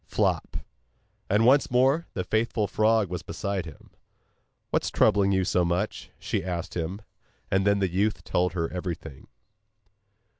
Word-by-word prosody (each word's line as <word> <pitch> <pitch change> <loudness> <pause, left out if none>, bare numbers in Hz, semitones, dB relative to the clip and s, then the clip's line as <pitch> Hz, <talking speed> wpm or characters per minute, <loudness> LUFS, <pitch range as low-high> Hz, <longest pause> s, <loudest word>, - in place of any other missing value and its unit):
Flop! - - 0 0.7
and 105 +3 +3
once 135 +3 +5
more 135 +7 +2
the 90 - -2
faithful 110 +2 0
frog 110 +1 +2
was 90 -1 -4
beside 100 0 -3
him. 80 - -13 0.8
'What - - +1
is - - -1
troubling 100 -2 +3
you 95 -1 +2
so 90 -1 +2
much?' 85 +5 -2
she - - -2
asked 85 -2 -4
him, 90 +5 -4 0.5
and 95 +1 +2
then 100 0 +4
the 100 -1 +1
youth 100 +4 0
told 90 -1 0
her 85 -2 -1
everything. 85 -6 -6
95 Hz, 150 wpm, -26 LUFS, 90-110 Hz, 0.8 s, once